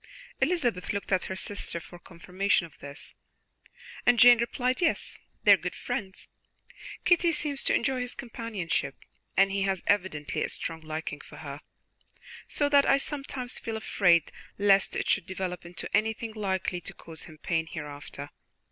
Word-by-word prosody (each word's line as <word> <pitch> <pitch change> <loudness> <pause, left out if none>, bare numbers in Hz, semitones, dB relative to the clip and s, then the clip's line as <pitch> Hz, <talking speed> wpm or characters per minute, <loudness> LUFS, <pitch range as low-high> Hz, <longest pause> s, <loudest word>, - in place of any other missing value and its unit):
Elizabeth 245 - +1
looked 200 0 -4
at 185 -1 +2
her 190 - -4
sister 195 -3 -3
for 175 +1 -12
confirmation 180 +1 0
of 160 - -16
this, 140 +1 -9 0.9
and 245 0 +5
Jane 240 0 +9
replied: 250 +3 0
"Yes, 335 - 0 0.2
they - - +7
are - - +6
good - - -4
friends. 190 -1 -4 0.8
Kitty 350 -1 +5
seems 295 -3 -1
to - - +3
enjoy 255 +2 +1
his 250 0 -3
companionship, 230 -8 -3 0.4
and 195 0 +5
he 195 0 0
has 190 -2 0
evidently 185 -7 0
a - - -1
strong 165 -1 -3
liking 155 -2 -5
for - - -13
her, 145 -1 -7 0.9
so 290 - +1
that 285 -1 +5
I 275 - +6
sometimes 275 -3 -4
feel 225 -1 -4
afraid 175 -6 +3 0.3
lest 200 -1 +4
it - - -1
should 190 - +2
develop 185 -2 -4
into 175 - -6
anything 220 +1 0
likely 190 -4 -1
to - - -7
cause 165 -1 -8
him 155 - -13
pain 160 +1 -1
hereafter. 145 -1 -7
195 Hz, 160 wpm, -28 LUFS, 170-240 Hz, 0.9 s, Jane